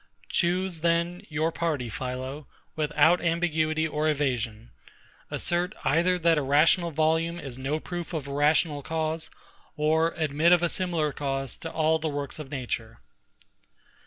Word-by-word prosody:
Choose, 180 0 +1
then, 170 +2 +1
your 160 +1 0
party, 160 -7 -1
PHILO, 130 +5 -5 0.3
without 155 +3 +3
ambiguity 160 -2 +1
or 155 0 0
evasion; 120 - -1 0.6
assert 175 +3 -1
either 175 +5 +3
that 165 -2 +3
a - - -1
rational 155 +5 +4
volume 160 +2 +1
is 130 -5 -7
no 140 +4 -1
proof 175 +1 -6
of 155 -5 -4
a 140 - -5
rational 145 +1 +2
cause, 160 +1 -2 0.5
or 160 +2 +2
admit 160 +2 +3
of 175 -1 +4
a 175 - +2
similar 170 -5 0
cause 135 -3 -3
to 165 - -6
all 160 0 +2
the 160 0 -2
works 145 0 -4
of 150 -3 -7
nature. 120 -5 -4
155 Hz, 145 wpm, -27 LUFS, 145-170 Hz, 0.6 s, rational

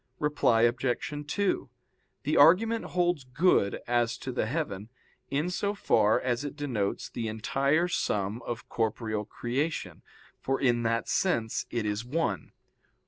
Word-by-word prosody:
Reply 145 -6 +2
Obj. 125 +4 0
2: 200 +5 0 0.5
The 150 - 0
argument 220 +10 +5
holds 175 -4 0
good 130 - +2
as 120 0 +1
to 130 - -5
the 120 -3 -1
heaven, 110 - -3 0.4
in 150 +6 0
so 200 +3 -1
far 110 - +3
as 125 0 -1
it 145 - -5
denotes 125 -10 -2
the 115 -2 -4
entire 140 +9 +1
sum 105 - -1
of 115 -1 -6
corporeal 110 -2 -2
creation, 135 +9 -3 0.4
for 135 0 -1
in 120 -3 +2
that 115 0 0
sense 115 -13 0
it 115 -3 -2
is 105 +1 -1
one. 125 - -2
125 Hz, 140 wpm, -29 LUFS, 115-155 Hz, 0.5 s, argument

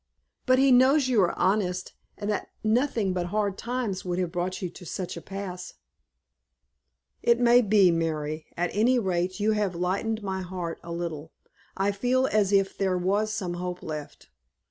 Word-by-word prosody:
"But 255 0 +5
he 270 0 +5
knows 260 +3 +5
you 240 -5 +3
are 175 - +1
honest, 185 -2 0 0.2
and 205 - -5
that 205 - -2 0.2
nothing 220 -3 +1
but 180 - -1
the 175 - -3
hard 205 +1 -1
times 235 -6 -3
would 180 -1 -2
have 180 -2 -1
brought 180 +1 -2
you 185 - -3
to - - -12
such 180 +1 -5
a 170 - -7
pass." 185 -2 -7 1.5
"It 235 0 +3
may 240 0 +6
be, 205 -4 +5
Mary. 155 -2 -2
At 175 +1 0
any 235 +5 +3
rate 185 -3 -1
you 210 +1 +2
have 205 -4 0
lightened 200 +5 -1
my 190 -1 -3
heart 180 -2 -5
a 170 - -9
little. 165 -2 -5 0.4
I 195 +1 +2
feel 250 +6 +1
as 210 -5 +2
if 195 -1 +2
there 190 -2 0
was 200 +4 0
some 195 -5 -3
hope 180 0 -5
left." 150 -2 -7
190 Hz, 180 wpm, -27 LUFS, 180-215 Hz, 1.5 s, may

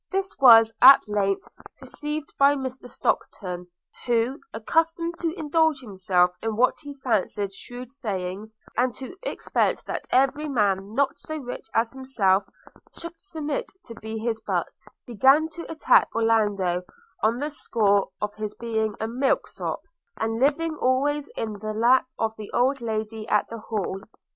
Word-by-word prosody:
This 390 0 -2
was 225 -4 +8
at 265 -2 +9
length 200 -2 0 0.3
perceived 300 0 -5
by 280 +1 +6
Mr 260 -2 -6
Stockton, 180 -6 -2 0.4
who, 240 +3 +1
accustomed 330 +8 0
to 330 -2 -1
indulge 320 -2 +2
himself 185 -6 +1
in 225 -1 -2
what 250 +3 +3
he 290 -2 -9
fancied 205 -4 0
shrewd 245 +4 -9
sayings, 210 -4 -4 0.2
and 245 +1 +1
to 265 +7 -8
expect - - -1
that - - -5
every 275 +3 +2
man 205 -4 0
not 280 0 +1
so 310 0 -5
rich 245 -6 -7
as 225 +1 +2
himself 225 -8 +1 0.5
should 335 0 -7
submit 305 -6 -4
to 230 - -9
be 220 0 -6
his 225 0 -2
butt, - - -2 0.3
began 270 +6 +4
to 335 +1 -8
attack 315 - +4
Orlando 205 -6 +1 0.4
on 225 +2 +2
the 295 +3 -3
score 205 -8 +1
of 210 0 -3
his 215 -1 -5
being 220 -2 -2
a 220 - -2
milk 255 +4 0
sop, - - -5 0.3
and 225 0 -2
living 310 +4 +1
always 285 +3 +1
in 215 -2 -4
the 215 +1 -4
lap 245 +4 +4
of 220 0 -1
the 215 -1 -8
old 265 +2 +2
lady 220 -1 -4
at - - +2
the 230 - -7
Hall. 210 -3 -3
235 Hz, 155 wpm, -25 LUFS, 215-280 Hz, 0.5 s, at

